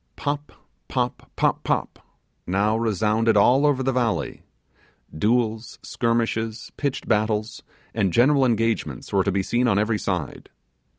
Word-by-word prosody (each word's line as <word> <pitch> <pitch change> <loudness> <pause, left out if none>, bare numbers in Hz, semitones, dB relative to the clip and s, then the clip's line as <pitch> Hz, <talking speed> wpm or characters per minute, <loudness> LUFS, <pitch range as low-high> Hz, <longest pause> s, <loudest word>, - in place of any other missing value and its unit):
Pop, 145 0 -3 0.4
Pop, - - -3
Pop, - - +1
Pop, - - -2 0.5
now 100 +4 +1
resounded 110 0 +1
all 130 +8 +5
over 135 -2 +1
the 135 - +1
valley. 120 -4 -1 0.7
Duels, 110 +4 0
skirmishes, 115 -1 -1
pitched 140 -2 -3
battles, 110 0 0 0.3
and 100 -5 +1
general 135 - +4
engagements 115 - -1
were 95 -1 +3
to 100 - 0
be 95 0 0
seen 120 +5 +1
on 100 -4 +2
every 105 +1 +1
side. 90 -10 -4
115 Hz, 130 wpm, -23 LUFS, 105-120 Hz, 0.7 s, all